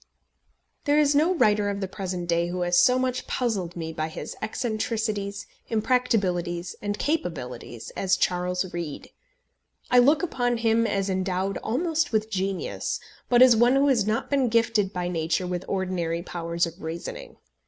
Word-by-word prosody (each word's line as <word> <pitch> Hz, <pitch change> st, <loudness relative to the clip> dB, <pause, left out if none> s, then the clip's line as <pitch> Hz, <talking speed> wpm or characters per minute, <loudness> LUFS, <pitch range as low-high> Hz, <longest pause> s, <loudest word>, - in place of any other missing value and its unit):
There 290 Hz, 0 st, +3 dB
is 295 Hz, -1 st, +4 dB
no 320 Hz, +6 st, +3 dB
writer 210 Hz, -8 st, +3 dB
of 200 Hz, 0 st, -3 dB
the 195 Hz, -, -2 dB
present 185 Hz, -2 st, -4 dB
day 170 Hz, 0 st, +1 dB
who 180 Hz, +1 st, -3 dB
has 175 Hz, 0 st, +3 dB
so 250 Hz, 0 st, +5 dB
much 255 Hz, 0 st, -1 dB
puzzled 200 Hz, -9 st, -1 dB
me 160 Hz, -1 st, -5 dB
by 155 Hz, -1 st, -2 dB
his 160 Hz, -, -7 dB
eccentricities, 215 Hz, -3 st, -2 dB, 0.2 s
impracticabilities, 200 Hz, -7 st, 0 dB
and 205 Hz, 0 st, -2 dB
capabilities 125 Hz, -, -3 dB
as 185 Hz, -1 st, +1 dB
Charles 180 Hz, +1 st, -1 dB
Reade. 170 Hz, -4 st, -5 dB, 0.8 s
I 250 Hz, -, +7 dB
look 290 Hz, +7 st, +4 dB
upon 245 Hz, -8 st, 0 dB
him 230 Hz, 0 st, +2 dB
as 195 Hz, -2 st, 0 dB
endowed 190 Hz, 0 st, -1 dB
almost 320 Hz, +4 st, 0 dB
with 220 Hz, 0 st, 0 dB
genius, 195 Hz, -1 st, -2 dB, 0.3 s
but 245 Hz, 0 st, +7 dB
as 250 Hz, -2 st, +7 dB
one 240 Hz, +3 st, +4 dB
who 280 Hz, +1 st, +4 dB
has 230 Hz, -6 st, +2 dB
not 215 Hz, +1 st, 0 dB
been 270 Hz, -3 st, +2 dB
gifted 225 Hz, -3 st, +2 dB
by 180 Hz, -2 st, -3 dB
nature 170 Hz, +1 st, -1 dB
with 180 Hz, 0 st, -3 dB
ordinary 175 Hz, -3 st, -2 dB
powers 170 Hz, -1 st, -1 dB
of 170 Hz, +2 st, -9 dB
reasoning. 160 Hz, +2 st, -6 dB
200 Hz, 160 wpm, -26 LUFS, 175-240 Hz, 0.8 s, I